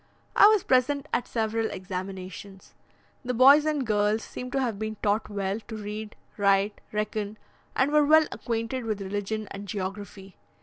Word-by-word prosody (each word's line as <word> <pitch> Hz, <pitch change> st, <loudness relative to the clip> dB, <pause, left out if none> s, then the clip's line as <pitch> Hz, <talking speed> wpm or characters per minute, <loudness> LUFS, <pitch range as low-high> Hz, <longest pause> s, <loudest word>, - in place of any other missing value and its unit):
I 410 Hz, -, +9 dB
was 425 Hz, -3 st, +4 dB
present 270 Hz, +2 st, +2 dB
at 245 Hz, -, 0 dB
several 225 Hz, -1 st, -1 dB
examinations: 190 Hz, +1 st, -7 dB, 0.5 s
the 250 Hz, 0 st, -2 dB
boys 280 Hz, +5 st, +7 dB
and 295 Hz, -4 st, 0 dB
girls 210 Hz, 0 st, +1 dB
seemed 250 Hz, 0 st, -7 dB
to 275 Hz, -, +1 dB
have 235 Hz, -6 st, -1 dB
been 220 Hz, 0 st, -3 dB
taught 210 Hz, +1 st, +1 dB
well 200 Hz, 0 st, -2 dB
to 225 Hz, -, -6 dB
read, 210 Hz, 0 st, -6 dB, 0.2 s
write, 200 Hz, 0 st, +2 dB
reckon, 210 Hz, 0 st, -3 dB, 0.4 s
and 265 Hz, +2 st, +2 dB
were 300 Hz, 0 st, +5 dB
well 310 Hz, +2 st, +6 dB
acquainted 235 Hz, +2 st, -3 dB
with 215 Hz, -2 st, -2 dB
religion 205 Hz, +2 st, -3 dB
and 200 Hz, +1 st, -7 dB
geography. 195 Hz, 0 st, -6 dB
215 Hz, 160 wpm, -27 LUFS, 200-250 Hz, 0.5 s, I